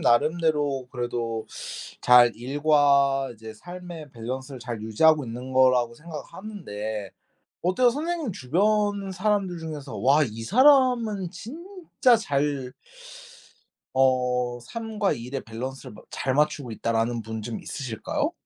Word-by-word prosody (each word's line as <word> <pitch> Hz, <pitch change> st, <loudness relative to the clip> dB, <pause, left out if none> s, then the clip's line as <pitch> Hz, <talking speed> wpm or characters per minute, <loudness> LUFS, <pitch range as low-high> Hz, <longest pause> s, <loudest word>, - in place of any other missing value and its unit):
나름대로 145 Hz, 0 st, +2 dB
그래도 120 Hz, -2 st, -3 dB, 0.5 s
잘 125 Hz, -1 st, +7 dB
일과 140 Hz, +1 st, +3 dB
이제 110 Hz, 0 st, -10 dB
삶의 175 Hz, +3 st, -9 dB
밸런스를 130 Hz, +2 st, -6 dB
잘 120 Hz, -3 st, -5 dB
유지하고 145 Hz, +7 st, +3 dB
있는 125 Hz, +3 st, -7 dB
거라고 130 Hz, -2 st, +4 dB
생각하는데 145 Hz, -, -7 dB, 0.5 s
어때요? 185 Hz, +8 st, +3 dB
선생님 310 Hz, -, -2 dB
주변 200 Hz, +7 st, +1 dB
사람들 190 Hz, -2 st, 0 dB
중에서 150 Hz, -4 st, -6 dB
'와 140 Hz, +5 st, +4 dB
이 115 Hz, -2 st, -6 dB
사람은 245 Hz, -, +4 dB
진짜 315 Hz, -, 0 dB
잘 140 Hz, -, -1 dB, 1.2 s
어 125 Hz, -2 st, +2 dB
삶과 220 Hz, -, -2 dB
일의 130 Hz, +2 st, -5 dB
밸런스를 125 Hz, +1 st, -7 dB
마 -, -, -13 dB
잘 130 Hz, -, -1 dB
맞추고 150 Hz, -3 st, +1 dB
있다.'라는 115 Hz, +1 st, -1 dB
분 110 Hz, 0 st, -6 dB
좀 115 Hz, +1 st, -4 dB
있으실까요? 295 Hz, -, -3 dB
140 Hz, 260 characters per minute, -25 LUFS, 120-190 Hz, 1.2 s, 잘